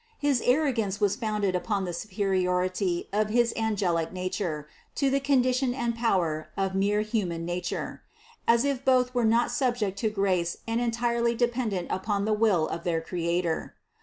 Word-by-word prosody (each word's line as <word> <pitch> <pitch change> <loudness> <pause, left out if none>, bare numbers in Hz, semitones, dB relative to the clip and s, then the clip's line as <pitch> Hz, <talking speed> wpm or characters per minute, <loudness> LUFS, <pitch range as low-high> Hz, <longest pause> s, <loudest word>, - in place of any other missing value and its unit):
His 285 -4 +1
ar 255 +5 +3
rogance 220 -7 -1
was 205 -2 +2
founded 210 -5 -1
upon 195 +1 -1
the 175 - -4
superiority 185 -1 0
of 210 +1 +1
his 235 +1 +2
angelic 190 -7 0
nature 180 -4 -3 0.3
to 275 -2 +1
the 275 - +2
condition 255 -2 +2
and 235 -2 -1
power 175 -9 0
of 195 -1 0
mere 200 +2 +2
human 195 -7 -2
na 175 +1 -2
ture: - - -4 0.5
as 235 +3 +4
if 275 -2 -1
both 250 -1 +3
were 245 -2 +2
not 230 +2 +3
subject 240 -6 0
to 220 - +1
grace 190 -4 0
and 230 +1 0
entirely 235 0 +1
dependent 235 -6 0
upon 200 +1 -1
the 215 - +1
will 210 -7 +3
of 170 - -5
their 170 -2 0
Creator. 170 0 -2
210 Hz, 165 wpm, -27 LUFS, 185-235 Hz, 0.5 s, as